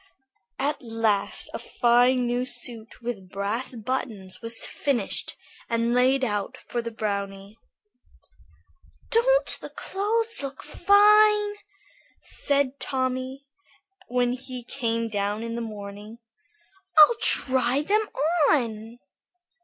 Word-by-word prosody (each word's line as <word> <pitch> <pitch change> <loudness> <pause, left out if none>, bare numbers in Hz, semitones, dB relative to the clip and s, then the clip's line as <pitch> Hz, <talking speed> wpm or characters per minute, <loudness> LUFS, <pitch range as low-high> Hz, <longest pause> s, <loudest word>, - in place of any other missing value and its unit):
At 285 +3 -2
last 225 -4 -1
a - - -4
fine 245 +1 +2
new 245 +1 0
suit 235 -2 -2
with 205 -6 -5
brass 205 +7 -3
buttons 220 -5 -4
was 230 0 +3
finished 245 -8 -2 0.3
and 230 0 0
laid 260 +2 +3
out 205 +2 -3
for 240 -1 -4
the 230 - -5
brownie. 200 -2 -4 1.6
"Don't - - +3
the - - -8
clothes 445 +2 0
look 275 -1 -6
fine?" 420 +1 +4 0.7
said 280 -1 -1
Tommy, 260 +1 -3 0.6
when 245 0 +1
he 255 -1 -7
came 230 -2 -2
down 205 0 -2
in 230 0 -5
the 235 - -4
morning; 210 0 -8 0.8
"I'll 310 +10 +8
try 260 +1 +2
them 425 +5 +1 0.4
on." 230 -4 -1
245 Hz, 105 wpm, -25 LUFS, 220-275 Hz, 1.6 s, I'll